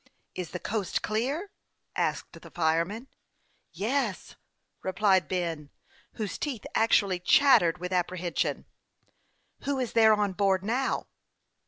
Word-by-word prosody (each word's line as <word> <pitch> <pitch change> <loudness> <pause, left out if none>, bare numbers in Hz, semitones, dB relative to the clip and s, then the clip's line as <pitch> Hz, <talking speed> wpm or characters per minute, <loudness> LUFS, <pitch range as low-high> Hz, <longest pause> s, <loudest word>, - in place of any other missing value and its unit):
" - - -45
Is 180 -2 -5
the 180 - -5
coast 210 -2 -2
clear? 275 - -2 0.2
" - - -48
asked - - -2
the - - -12
firemen. 170 +8 0 0.4
" - - -43
Yes," 245 -5 -1 0.5
replied 190 -2 +2
Ben, 165 -5 -3 0.4
whose 210 -6 -4
teeth 265 -8 -4
actually 200 -4 +3
chattered 180 - +5
with 180 +2 -5
apprehension. 180 -1 -1 0.5
" - - -44
Who 280 0 0
is 255 -3 -2
there 220 -1 +6
on 205 -2 0
board 195 -1 +1
now 250 +6 -1
200 Hz, 135 wpm, -28 LUFS, 180-230 Hz, 0.5 s, there